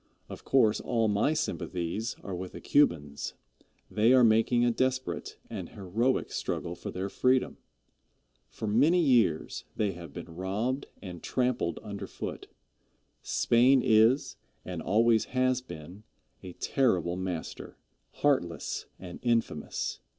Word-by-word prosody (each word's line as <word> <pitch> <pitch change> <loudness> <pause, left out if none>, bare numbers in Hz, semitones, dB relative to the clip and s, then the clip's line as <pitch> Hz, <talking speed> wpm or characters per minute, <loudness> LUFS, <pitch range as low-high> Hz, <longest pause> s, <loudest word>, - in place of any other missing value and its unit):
Of - - -9
course, 115 -6 +3
all 115 -2 +1
my 105 +8 +2
sympathies 105 - -3
are 100 - -5
with 90 0 -6
the - - -7
Cubans. 75 - +1 0.6
They 110 +4 +4
are 130 -1 +6
making 115 +2 +4
a 120 - +3
desperate 130 +2 -2
an - - -6
heroic 110 +7 -1
struggle 85 - -3
for 85 - -7
their 95 +1 -3
freedom. 130 +5 +1 0.9
For - - -6
many 140 +12 +4
years 120 - +2
they 105 -2 0
have 85 -4 -10
been - - -7
robbed 105 +10 -2 0.2
and 90 -4 -8
trampled 125 -9 -1
under 100 -2 -6
foot. - - -6 0.7
Spain 125 +2 +3
is, 110 +5 +4 0.3
and 90 -3 -5
always 110 +5 +3
has 130 0 +2
been, 90 -4 -10 0.4
a 90 -1 -9
terrible 90 - +1
master 90 -3 -5 0.4
heartless 110 - 0
and 90 -1 -9
infamous. 115 -11 -1
110 Hz, 130 wpm, -29 LUFS, 90-125 Hz, 0.9 s, are